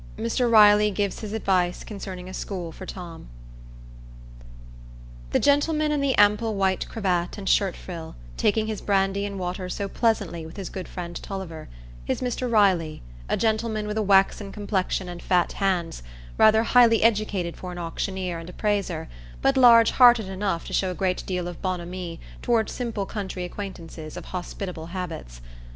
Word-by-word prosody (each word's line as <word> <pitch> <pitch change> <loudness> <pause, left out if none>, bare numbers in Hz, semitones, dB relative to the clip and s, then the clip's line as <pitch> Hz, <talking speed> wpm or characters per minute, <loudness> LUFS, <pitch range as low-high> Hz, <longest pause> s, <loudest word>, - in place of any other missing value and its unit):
Mr 240 - 0
Riley 210 -1 +7
Gives 200 -1 -2
His 215 -2 -6
Advice 185 -5 0
Concerning 190 -3 -7
a 185 - -8
School 180 -4 -5
for 185 +3 -10
Tom 175 - -8 2.0
The - - +2
gentleman 300 +2 +2
in 295 -1 0
the 275 -2 +1
ample 210 +2 +4
white 190 -1 0
cravat 180 -5 -1
and 195 -2 -7
shirt 195 -3 +2
frill, 165 -3 -8 0.2
taking 215 - +1
his 215 -1 -4
brandy 195 0 +1
and 200 -1 -6
water 180 0 -4
so 200 +2 -3
pleasantly 200 -7 0
with 160 +4 -10
his 195 -3 -6
good 185 - -6
friend 175 -1 -7
Tulliver, 185 -5 -7 0.4
is - - 0
Mr 250 0 -2
Riley, 185 - +2 0.3
a - - +1
gentleman 220 -1 0
with 210 0 -3
a 220 - +1
waxen 195 0 +3
complexion 195 -3 -2
and 175 -1 -7
fat 180 -2 +2
hands, 180 - -1 0.3
rather 220 +1 +5
highly 230 -2 +5
educated 210 -6 +1
for 180 - -7
an 175 - -8
auctioneer 175 +1 -3
and 165 +1 -9
appraiser, 205 +1 -1 0.4
but 270 0 +3
large 235 -3 +7
hearted 240 -5 +6
enough 190 -3 -2
to - - -7
show 190 - +1
a 180 - -4
great 185 -1 -1
deal 180 -2 -2
of 175 -2 -8
bonhomie 180 -2 -4 0.2
toward 230 -2 +1
simple 230 -5 -3
country 190 -3 -5
acquaintances 170 -5 -7
of - - -8
hospitable 180 -2 -6
habits. 165 - -6
195 Hz, 165 wpm, -25 LUFS, 180-215 Hz, 2.0 s, Riley